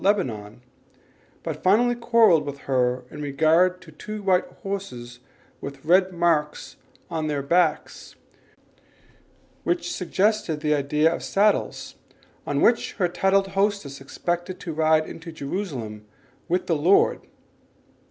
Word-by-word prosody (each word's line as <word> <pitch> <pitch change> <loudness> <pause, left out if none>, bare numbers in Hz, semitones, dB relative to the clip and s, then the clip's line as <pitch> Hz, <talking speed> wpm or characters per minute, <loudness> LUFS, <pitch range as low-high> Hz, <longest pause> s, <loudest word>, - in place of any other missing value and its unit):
Lebanon, 120 - -1 0.8
but - - -5
finally 230 +6 +4
quarrelled 230 -9 +4
with 140 -1 -6
her 125 -1 0
in 150 - -8
regard 160 +6 +2
to 160 - -14
two 210 +6 -8
white 185 -2 +2 0.2
horses 125 -12 -6 0.4
with 140 0 -8
red 185 +3 +4
marks 170 -4 0 0.4
on 160 -2 -2
their 145 -2 -2
backs 175 +6 0 1.5
which 350 -1 -1
suggested 185 -3 0
the 150 0 +1
idea 150 +3 +2
of - - -5
saddles, 205 +1 0 0.5
on - - 0
which 235 - +2
her 180 - 0
titled 195 +2 +1
hostess 195 -8 -1
expected 175 +6 -4
to 165 - -6
ride 155 0 +3
into 165 +1 -9
Jerusalem 140 - -5 0.4
with 180 +2 0
the 165 - +1
Lord. 170 +7 +3
165 Hz, 125 wpm, -24 LUFS, 145-195 Hz, 1.5 s, finally